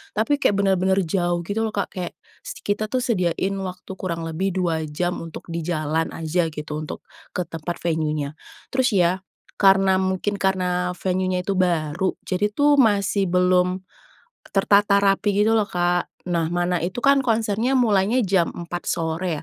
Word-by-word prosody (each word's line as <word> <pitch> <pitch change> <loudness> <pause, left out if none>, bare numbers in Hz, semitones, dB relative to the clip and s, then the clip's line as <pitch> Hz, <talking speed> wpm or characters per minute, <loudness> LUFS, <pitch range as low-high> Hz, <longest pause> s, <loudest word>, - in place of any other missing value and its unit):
tapi 260 +7 +2
kayak 205 - +3
bener-bener 190 -1 +2
jauh 175 0 0
gitu 205 +6 -2
loh 220 - -1
Kak. 200 - 0
Kayak 180 -2 -4 0.3
s - - -8
kita 205 +1 -1
tuh 255 - +1
sediain 190 -4 0
waktu 185 0 -7
kurang 170 -3 -4
lebih 180 +5 -1
2 165 -3 0
jam 175 +4 -2
untuk 165 -1 -9
di 170 0 -4
jalan 155 -1 -1
aja 165 +1 0
gitu, 150 0 -5
untuk 155 - -6 0.3
ke 180 - -3
tempat 165 +1 -5
venue-nya. 155 -3 -1 0.4
Terus 260 -1 +2
ya, 175 -2 +4 0.4
karena 195 -1 +5
mungkin 190 +2 -1
karena 180 -2 0
venue-nya 185 -1 0
tuh 200 - 0
baru, 170 0 +1
jadi 205 +3 0
tuh 290 +6 +4
masih 200 -3 +2
belum 180 0 +3 0.7
tertata 200 0 +4
rapi 195 +1 +2 0.2
gitu 225 - +3
loh 210 -2 0
Kak. 175 0 0 0.2
Nah 165 -2 +1
mana 175 0 0
itu 185 +6 -3
kan 275 0 +5
konsernya 225 +2 +1
mulainya 215 0 +3
jam 185 -3 +2
4 175 0 -6
sore 165 0 -1
185 Hz, 160 wpm, -23 LUFS, 170-200 Hz, 0.7 s, karena